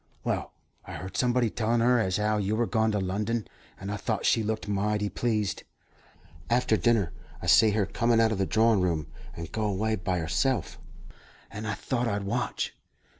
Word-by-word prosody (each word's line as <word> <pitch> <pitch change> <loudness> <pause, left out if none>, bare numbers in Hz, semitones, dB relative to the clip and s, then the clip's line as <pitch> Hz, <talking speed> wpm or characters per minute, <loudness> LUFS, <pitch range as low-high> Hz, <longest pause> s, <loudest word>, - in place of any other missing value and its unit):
"Well, - - -2 0.3
I - - -9
heard 95 +1 -7
somebody 125 -2 +2
tellin' 115 +1 0
her 125 +1 +4
as 95 -4 0
'ow 105 0 +1
you 105 +1 0
were 120 +2 +1
gone 110 -1 +1
to 105 - +1
London, 105 +4 -2 0.3
and 95 +1 -5
I 105 - -2
thought - - -2
she 115 - +4
looked 110 0 -2
mighty 105 +1 0
pleased. 110 -4 -1 0.9
After 120 -2 +3
dinner, 110 -6 +2 0.3
I - - -9
see 110 - +6
her 105 -1 +1
come 115 +4 0
out 115 -1 +4
of 105 - -2
the 95 - +1
drawin' 110 -2 +3
room, 85 -4 0 0.3
and 85 0 -7
go 110 -1 -1
away 105 +2 0
by 95 -2 -2
herself, 85 +11 -1 0.7
and 110 0 -6
I 105 - -1
thought 120 +3 -2
I'd 100 -2 -1
watch. 100 - -2
105 Hz, 185 wpm, -28 LUFS, 100-115 Hz, 0.9 s, see